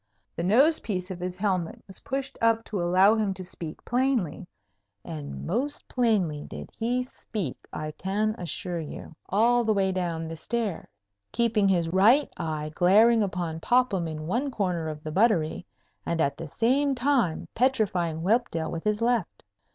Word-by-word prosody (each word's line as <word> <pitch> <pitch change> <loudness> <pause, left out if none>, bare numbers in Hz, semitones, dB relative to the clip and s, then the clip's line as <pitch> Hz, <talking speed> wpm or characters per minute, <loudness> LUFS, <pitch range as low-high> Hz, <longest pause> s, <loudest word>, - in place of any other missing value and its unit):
The - - -3
nose 265 - +4
piece 185 -3 -4
of 180 - -6
his 180 0 -4
helmet 185 -4 -1
was 190 - -11
pushed 270 0 -4
up 225 0 +3
to 205 -4 -3
allow 185 +4 +5
him 210 -3 0
to 185 - -6
speak 170 -3 -8
plainly, 240 - 0 0.6
and 150 -4 -6
most 255 - -2
plainly 195 -12 +1
did - - -9
he 245 +2 0
speak, 210 - -5 0.2
I 155 0 -4
can 205 +6 -1
assure 175 0 -4
you, 160 +1 -8
all 235 +4 +3
the 215 -1 +2
way 190 -1 +2
down 165 -3 -3
stairs, 220 +2 -3 0.4
keeping 225 -4 +2
his 175 -3 +2
right 215 - +4
eye 155 -1 -3
glaring 220 +7 +5
upon 180 -5 -2
Popham 225 -5 +2
in 155 -1 -5
one 240 - 0
corner 180 -9 -1
of 155 -1 -6
the 155 - -5
buttery, 180 -4 +2 0.4
and 170 -1 -2
at 140 -3 +1
the 165 - -7
same 270 - +2
time 245 - +1
petrifying 185 -10 +1
Whelpdale 195 -6 +1
with 165 - -4
his 210 +1 0
left. 235 -6 0
195 Hz, 160 wpm, -27 LUFS, 165-235 Hz, 0.6 s, allow